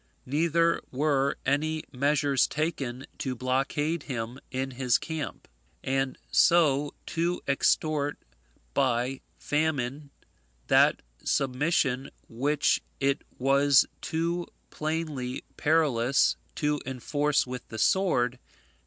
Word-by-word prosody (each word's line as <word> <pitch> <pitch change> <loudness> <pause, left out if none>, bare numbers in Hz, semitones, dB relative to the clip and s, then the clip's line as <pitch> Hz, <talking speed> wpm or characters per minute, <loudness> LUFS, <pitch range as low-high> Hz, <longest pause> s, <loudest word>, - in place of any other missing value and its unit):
Neither 165 +4 +2
were 140 0 +1
any 155 +3 0
measures 140 0 +2
taken 140 -5 -3
to 130 -2 -2
blockade 135 +6 0
him 125 -2 -5
in 135 +1 -3
his 125 -1 +2
camp, 160 -3 -5 0.4
and 135 0 -1
so 150 -5 +4
to 170 +2 -1
extort 145 +1 +1 0.6
by 130 0 +1 0.2
famine 145 -2 -1 0.6
that - - +4 0.2
submission 135 -1 +1 0.2
which 140 +5 +1 0.2
it 140 +1 +1 0.2
was 140 +1 +5 0.2
too 170 +2 -1 0.2
plainly 155 -5 -3
perilous 140 -5 +3 0.2
to 150 -1 0
enforce 145 +3 0
with 125 -1 -7
the 110 - -8
sword. 125 -9 +2
140 Hz, 95 wpm, -28 LUFS, 130-155 Hz, 0.6 s, was